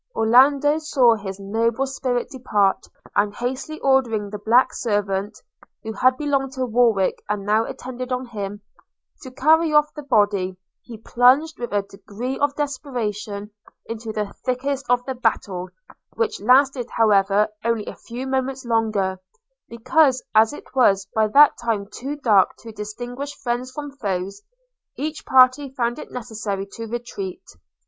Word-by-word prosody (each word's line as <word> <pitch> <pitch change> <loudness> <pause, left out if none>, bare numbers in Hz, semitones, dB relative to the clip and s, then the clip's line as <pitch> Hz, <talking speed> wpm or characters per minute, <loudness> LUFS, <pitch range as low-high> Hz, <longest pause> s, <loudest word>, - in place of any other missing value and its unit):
Orlando 275 +6 +4
saw 265 -6 +4
his 200 -3 -6
noble 225 +6 0
spirit 255 -2 -2
depart, 210 -7 0 0.3
and 205 0 +1
hastily 260 +6 -4
ordering 235 -7 +1
the 210 - -6
black 235 +5 +3
servant 205 -2 -2 0.5
(who 220 0 -5
had 255 +4 +3
belonged 275 -2 -1
to 260 -2 -2
Warwick, 230 -5 +2
and 205 -1 -2
now 215 +2 +2
attended 255 0 -7
on 255 0 -2
him) 205 -3 -6 0.6
to 260 - -9
carry 315 +5 +3
off 300 0 +3
the 300 - -7
body, 205 -8 +1 0.2
he 235 -2 -10
plunged 255 +8 +3
with 240 - -5
a 205 -1 +1
degree 205 +6 -6
of 285 0 +1
desperation 220 -8 -4 0.3
into 225 0 -6
the 210 -2 -4
thickest 270 +2 -2
of 245 0 +2
the 265 - -3
battle; 205 -7 -1 0.5
which 455 - -1
lasted, 255 +2 +3
however, 205 -1 +3
only 230 -2 0
a - - -6
few 245 +3 -8
moments 265 0 -2
longer, 215 -5 0 0.5
because, 255 +3 +2
as 220 0 +5
it 295 - -12
was 200 -7 +3
by 220 -1 +2
that 285 +7 +6
time 220 -4 -1
too 260 +8 -6
dark 215 -9 +3
to 230 - -11
distinguish 245 +7 -6
friends 250 -1 -3
from 290 +1 -7
foes, 195 -3 -3 0.6
each 305 +2 -5
party 260 +2 +5
found 245 -1 -2
it - - -9
necessary 215 -5 -4
to 225 +3 -8
retreat. 355 - -6
240 Hz, 150 wpm, -22 LUFS, 210-265 Hz, 0.6 s, that